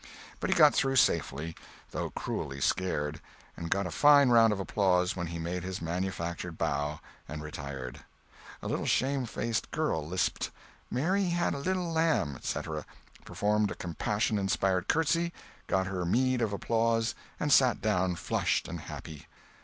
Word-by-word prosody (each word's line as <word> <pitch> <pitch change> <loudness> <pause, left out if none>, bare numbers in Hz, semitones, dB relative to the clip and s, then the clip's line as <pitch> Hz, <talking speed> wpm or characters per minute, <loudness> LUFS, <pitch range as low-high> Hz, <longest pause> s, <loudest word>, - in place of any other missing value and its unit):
But - - -2
he - - +3
got - - +7
through 135 -1 +1
safely, 80 - +2 0.4
though - - -3
cruelly 70 0 -4
scared, 75 -2 0 0.3
and 85 - -5
got 100 +2 +1
a 90 - -4
fine 145 - +6
round 115 -2 +6
of 105 - -1
applause 95 0 +2
when 85 -2 -3
he 85 0 -5
made 85 +2 -3
his 95 +1 -4
manufactured 85 0 -3
bow 75 -1 -1 0.3
and 75 0 -6
retired. 70 -3 -6 0.6
A - - -3
little - - -2
shamefaced 125 -4 0
girl 150 - 0
lisped, 90 +2 -1 0.4
"Mary 185 +10 +1
had 175 -1 +1
a 140 - -4
little 180 +2 -1
lamb," 160 - +2
etc., 75 +4 -4 0.4
performed 105 0 +1
a - - -5
compassion 105 +5 -1
inspiring 95 -1 +1
curtsy, 165 +2 +1 0.3
got 95 0 +1
her 90 -1 -3
meed 125 +7 +2
of 110 -3 +1
applause, 115 +2 +1 0.3
and 145 -1 +2
sat 130 -4 +5
down 95 -4 +1
flushed - - 0
and - - -5
happy. 75 -3 -9
95 Hz, 155 wpm, -30 LUFS, 85-125 Hz, 0.6 s, got